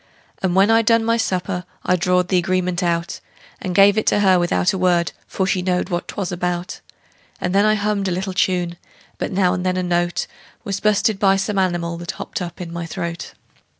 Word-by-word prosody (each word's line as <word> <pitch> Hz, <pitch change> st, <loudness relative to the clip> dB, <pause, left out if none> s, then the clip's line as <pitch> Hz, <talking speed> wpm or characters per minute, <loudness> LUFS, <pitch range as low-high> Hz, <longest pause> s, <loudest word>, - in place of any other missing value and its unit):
And 185 Hz, -2 st, 0 dB
when 195 Hz, +3 st, +5 dB
I'd 225 Hz, -1 st, +3 dB
done 230 Hz, -1 st, +4 dB
my 230 Hz, 0 st, +2 dB
supper 185 Hz, -4 st, -1 dB, 0.2 s
I 180 Hz, -, +3 dB
drawed 180 Hz, +1 st, +1 dB
the 185 Hz, -, +3 dB
agreement 180 Hz, 0 st, 0 dB
out, 170 Hz, 0 st, -1 dB, 0.4 s
And 180 Hz, -2 st, -3 dB
give 200 Hz, +2 st, +6 dB
it -, -, -4 dB
to 205 Hz, -, +3 dB
her 190 Hz, -2 st, +5 dB
without 175 Hz, +1 st, +1 dB
a -, -, -2 dB
word, 175 Hz, -2 st, +2 dB, 0.2 s
for 190 Hz, -, -1 dB
she 190 Hz, -1 st, 0 dB
knowed 180 Hz, 0 st, -1 dB
what 175 Hz, -1 st, -2 dB
'twas 190 Hz, -3 st, -4 dB
about; 180 Hz, 0 st, -3 dB, 0.6 s
And 180 Hz, -, -2 dB
then 200 Hz, +1 st, +4 dB
I 215 Hz, 0 st, +4 dB
hummed 205 Hz, -1 st, -1 dB
a -, -, 0 dB
little 190 Hz, +2 st, -2 dB
tune, 180 Hz, -2 st, 0 dB, 0.4 s
but -, -, -2 dB
now 185 Hz, -1 st, +2 dB
and 180 Hz, -1 st, -2 dB
then 185 Hz, 0 st, 0 dB
a 185 Hz, -, 0 dB
note 175 Hz, -1 st, 0 dB, 0.4 s
Was 200 Hz, -3 st, -3 dB
bu'sted 210 Hz, -1 st, +2 dB
by 195 Hz, -1 st, +4 dB
some 195 Hz, +1 st, -1 dB
animal 175 Hz, -2 st, -1 dB
that 170 Hz, 0 st, -5 dB
hopped -, -, -6 dB
up 175 Hz, -1 st, -6 dB
in 170 Hz, -2 st, -6 dB
my 170 Hz, -1 st, -4 dB
throat. 170 Hz, +1 st, -5 dB
185 Hz, 215 wpm, -20 LUFS, 175-195 Hz, 0.6 s, give